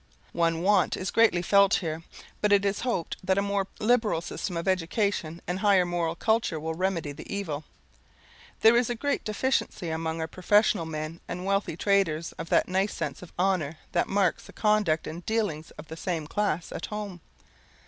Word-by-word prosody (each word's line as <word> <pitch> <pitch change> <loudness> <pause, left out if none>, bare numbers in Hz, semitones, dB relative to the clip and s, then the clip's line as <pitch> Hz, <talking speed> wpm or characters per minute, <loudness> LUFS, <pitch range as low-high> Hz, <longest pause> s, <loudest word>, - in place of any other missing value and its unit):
One 165 0 +1
want 195 -1 +3
is 185 - -3
greatly 220 -6 +4
felt 200 +1 +5
here; 160 -3 -2 0.4
but 210 - +2
it 200 0 +5
is 200 0 +1
to - - -5
be 250 - -1
hoped 180 -8 -2
that 190 +1 +1
a - - +4
more 200 -1 0
liberal 225 -5 +2
system 175 +1 -4
of 170 - -4
education 180 -2 0
and 180 +1 -2
higher 195 -3 +4
moral 170 -2 -1
culture 220 -5 +1
will 160 +1 -3
remedy 170 -3 -1
the 140 - -10
evil. 155 -7 -3 1.0
There 225 +1 +7
is 240 0 +3
a 240 - -1
great 285 +5 -1
deficiency 210 -5 -1
among 160 0 -2
our 160 - -2
professional 185 0 +2
men 155 +1 -5
and 180 - -5
wealthy 195 -4 0
traders 170 -5 +1
of 165 - -5
that - - +3
nice 190 +3 0
sense 150 -4 -4
of 180 - -11
honour 175 -5 +1
that 175 - +1
marks 195 -3 +1
the - - -13
conduct 210 -7 +2
and 170 +3 -6
dealings 205 -9 -1
of 150 - -10
the 160 - -7
same 165 -3 -2
class 180 -1 -1
at - - -5
home. 205 -4 -6
185 Hz, 190 wpm, -27 LUFS, 165-205 Hz, 1.0 s, There